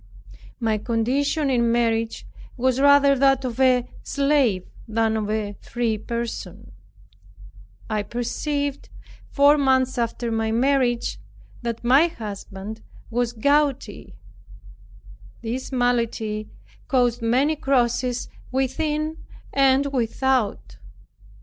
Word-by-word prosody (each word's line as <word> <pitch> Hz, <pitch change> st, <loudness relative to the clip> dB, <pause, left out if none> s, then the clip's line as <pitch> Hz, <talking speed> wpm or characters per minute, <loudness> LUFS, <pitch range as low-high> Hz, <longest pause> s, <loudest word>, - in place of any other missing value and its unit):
My 220 Hz, -3 st, 0 dB
condition 265 Hz, +7 st, 0 dB
in 235 Hz, -2 st, +2 dB
marriage 230 Hz, -1 st, 0 dB, 0.3 s
was 260 Hz, +1 st, +1 dB
rather 285 Hz, 0 st, +6 dB
that 270 Hz, -1 st, +3 dB
of 245 Hz, 0 st, -4 dB
a 255 Hz, -2 st, +3 dB
slave 275 Hz, -10 st, +1 dB, 0.2 s
than 220 Hz, 0 st, +1 dB
of 215 Hz, -1 st, -2 dB
a 210 Hz, -1 st, -2 dB
free 230 Hz, -3 st, -2 dB
person. 235 Hz, -5 st, -5 dB, 1.2 s
I 215 Hz, -1 st, -1 dB
perceived, 280 Hz, +6 st, -3 dB, 0.4 s
four 290 Hz, +1 st, +5 dB
months 260 Hz, -2 st, +2 dB
after 235 Hz, 0 st, -2 dB
my 225 Hz, 0 st, 0 dB
marriage, 245 Hz, 0 st, +1 dB, 0.4 s
that 235 Hz, -1 st, -4 dB
my 270 Hz, +7 st, +5 dB
husband 210 Hz, -, -8 dB, 0.3 s
was 240 Hz, 0 st, 0 dB
gouty. 275 Hz, -, 0 dB, 1.3 s
This 245 Hz, +4 st, -4 dB
malady 230 Hz, -4 st, -1 dB, 0.4 s
caused 245 Hz, -3 st, +1 dB
many 260 Hz, +7 st, +2 dB
crosses 250 Hz, -3 st, 0 dB, 0.2 s
within 300 Hz, +4 st, -1 dB, 0.4 s
and 270 Hz, 0 st, +4 dB
without. 235 Hz, -, 0 dB
245 Hz, 100 wpm, -23 LUFS, 225-275 Hz, 1.3 s, rather